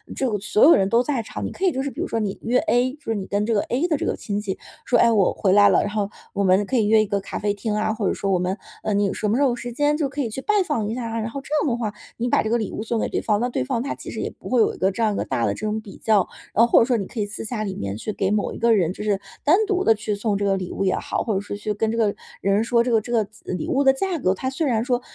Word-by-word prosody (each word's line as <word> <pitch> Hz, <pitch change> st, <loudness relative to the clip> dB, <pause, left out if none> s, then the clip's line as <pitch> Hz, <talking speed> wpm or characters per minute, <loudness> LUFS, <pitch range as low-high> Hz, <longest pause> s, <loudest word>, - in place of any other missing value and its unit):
这 265 Hz, -, 0 dB
个 210 Hz, -, 0 dB
所 210 Hz, +1 st, +2 dB
有 330 Hz, -, +8 dB
人 190 Hz, -, +2 dB
都 230 Hz, +2 st, +4 dB
在 270 Hz, -3 st, -1 dB
场。 -, -, -6 dB
你 -, -, -4 dB
可 385 Hz, -, -3 dB
以 370 Hz, -, +4 dB
就 265 Hz, -, -2 dB
是 280 Hz, -, -2 dB
比 245 Hz, -, -10 dB
如 -, -, -1 dB
说 225 Hz, -, -1 dB
你 205 Hz, -3 st, -2 dB
约 245 Hz, +2 st, +2 dB
A， 255 Hz, -4 st, +1 dB
就 300 Hz, -, -16 dB
是 225 Hz, -, -1 dB
你 195 Hz, -2 st, -3 dB
跟 205 Hz, +1 st, -1 dB
这 230 Hz, -, 0 dB
个 205 Hz, -, +3 dB
A 270 Hz, +9 st, -1 dB
的 315 Hz, -4 st, +1 dB
这 -, -, -3 dB
个 -, -, 0 dB
亲 205 Hz, -1 st, -3 dB
戚 195 Hz, -2 st, -4 dB, 0.3 s
说： 245 Hz, -, +3 dB
“哎 -, -, +6 dB
呀， 230 Hz, -, +4 dB
我 200 Hz, -4 st, +3 dB
回 190 Hz, -, +1 dB
来 205 Hz, 0 st, +7 dB
了， -, -, +4 dB
然 205 Hz, -, -2 dB
后 205 Hz, -1 st, -1 dB, 0.3 s
我 200 Hz, -, 0 dB
们 190 Hz, +2 st, +4 dB
可 260 Hz, -, -1 dB
以 220 Hz, -, +3 dB
约 220 Hz, 0 st, +5 dB
一 -, -, +1 dB
个 200 Hz, 0 st, 0 dB
咖 195 Hz, -, -6 dB
啡 205 Hz, 0 st, 0 dB
厅 210 Hz, +1 st, -3 dB
啊， 215 Hz, +1 st, 0 dB
或 215 Hz, -3 st, -1 dB
者 -, -, +1 dB
说 195 Hz, -, -2 dB
我 185 Hz, -, +3 dB
们 180 Hz, +2 st, -1 dB, 0.3 s
呃， 215 Hz, -, 0 dB
你 205 Hz, 0 st, +2 dB
有 195 Hz, -, -1 dB
什 215 Hz, -, -2 dB
么 210 Hz, -, +2 dB
时 -, -, +1 dB
候 275 Hz, -, +4 dB
有 240 Hz, -, -1 dB
时 245 Hz, 0 st, -6 dB
间 290 Hz, +4 st, +2 dB
就 300 Hz, -3 st, 0 dB
可 285 Hz, +2 st, -3 dB
以 240 Hz, -, -1 dB
去 245 Hz, +5 st, -5 dB
拜 420 Hz, -, 0 dB
访 235 Hz, -10 st, -1 dB
一 220 Hz, -, -2 dB
下 250 Hz, -, -4 dB
儿 225 Hz, -, -4 dB
啊。” -, -, -1 dB
然 220 Hz, -, -3 dB
后 275 Hz, -, -5 dB
这 -, -, -14 dB
样 290 Hz, -, +1 dB
的 -, -, -1 dB
话， 220 Hz, -3 st, -2 dB, 0.3 s
你 235 Hz, -, -1 dB
把 -, -, +3 dB
这 220 Hz, -, -2 dB
个 235 Hz, -, +3 dB
礼 215 Hz, -, -3 dB
物 215 Hz, -, -4 dB
送 225 Hz, 0 st, -1 dB
给 -, -, -1 dB
对 -, -, -1 dB
方， 210 Hz, -2 st, +1 dB
那 245 Hz, -, 0 dB
对 185 Hz, -, -1 dB
方 230 Hz, -, -1 dB
他 280 Hz, -, -3 dB
其 -, -, -9 dB
实 -, -, -6 dB
也 -, -, -2 dB
不 -, -, -13 dB
会 250 Hz, -, +2 dB
有 -, -, +2 dB
一 -, -, -12 dB
个 190 Hz, +1 st, +2 dB
这 215 Hz, -, -5 dB
样 215 Hz, -2 st, +2 dB
一 -, -, -3 dB
个 -, -, -1 dB
大 115 Hz, -, -1 dB
的 100 Hz, -, 0 dB
这 -, -, -5 dB
种 215 Hz, +1 st, -2 dB
比 205 Hz, -2 st, -12 dB
较。 210 Hz, -4 st, +2 dB, 0.3 s
然 230 Hz, -, +5 dB
后 -, -, -1 dB
或 -, -, +7 dB
者 -, -, +4 dB
说 245 Hz, -1 st, +1 dB
你 200 Hz, -, -3 dB
可 240 Hz, -, -7 dB
以 210 Hz, -, +1 dB
私 205 Hz, +1 st, -7 dB
下 215 Hz, -1 st, -3 dB
里 195 Hz, -2 st, -3 dB
面 100 Hz, -, -4 dB
去 215 Hz, -, -4 dB
给 190 Hz, -, 0 dB
某 210 Hz, -1 st, 0 dB
一 -, -, -7 dB
个 230 Hz, 0 st, +4 dB
人， 180 Hz, -3 st, +1 dB
就 210 Hz, -, -7 dB
是 205 Hz, -2 st, +1 dB, 0.2 s
单 300 Hz, +4 st, +5 dB
独 380 Hz, -2 st, +1 dB
地 225 Hz, -, +5 dB
去 215 Hz, 0 st, -3 dB
送 205 Hz, 0 st, -1 dB
这 200 Hz, -, -1 dB
个 195 Hz, -1 st, +2 dB
礼 185 Hz, -2 st, -5 dB
物 -, -, -2 dB
也 185 Hz, -, +2 dB
好， -, -, -2 dB
或 220 Hz, -, -1 dB
者 190 Hz, -, 0 dB
说 205 Hz, -, -6 dB
去 210 Hz, +1 st, -3 dB
跟 220 Hz, +2 st, -1 dB
这 230 Hz, -, -3 dB
个 215 Hz, -3 st, +2 dB, 0.3 s
人 200 Hz, +2 st, +2 dB
说 235 Hz, 0 st, +2 dB
这 245 Hz, -, -1 dB
个 225 Hz, -2 st, +3 dB
这 240 Hz, -, -8 dB
个 230 Hz, -2 st, +3 dB
子 215 Hz, +2 st, -21 dB
呃， -, -, -2 dB
礼 180 Hz, -, -3 dB
物 275 Hz, +1 st, +2 dB
的 270 Hz, -1 st, +6 dB
价 360 Hz, +6 st, -1 dB
格， 185 Hz, -7 st, +2 dB
它 260 Hz, +7 st, -3 dB
虽 280 Hz, +4 st, -1 dB
然 225 Hz, -4 st, +1 dB
说， 250 Hz, -1 st, 0 dB
220 Hz, 405 characters per minute, -23 LUFS, 205-245 Hz, 0.3 s, 有